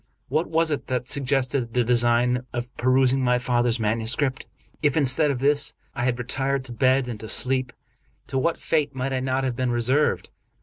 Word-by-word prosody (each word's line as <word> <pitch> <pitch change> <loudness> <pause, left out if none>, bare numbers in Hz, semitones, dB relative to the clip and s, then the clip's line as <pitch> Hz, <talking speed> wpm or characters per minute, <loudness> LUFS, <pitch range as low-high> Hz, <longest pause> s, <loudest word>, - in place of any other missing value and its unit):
What 155 +6 0
was 165 0 +1
it 145 - -3
that 125 -1 -2
suggested 130 -3 -1
the 125 - +3
design 120 +1 +2
of 120 0 -5
perusing 130 +1 +3
my 125 0 +3
father's 120 -1 0
manuscript? 115 +5 0 0.3
If, 145 -1 +2
instead 145 +1 +4
of 140 - -1
this, 145 +3 +1 0.2
I 120 - -2
had 125 -1 0
retired 135 +2 -1
to 125 - -7
bed 130 +1 +2
and 115 -3 -6
to 110 - -8
sleep, 130 -1 0 0.5
to 135 +1 -2
what 165 +5 0
fate 145 -3 -1
might 130 +1 -2
I 130 - 0
not 130 +1 -1
have 130 -2 -1
been 130 0 -1
reserved. 125 +5 +1
130 Hz, 185 wpm, -24 LUFS, 120-135 Hz, 0.5 s, instead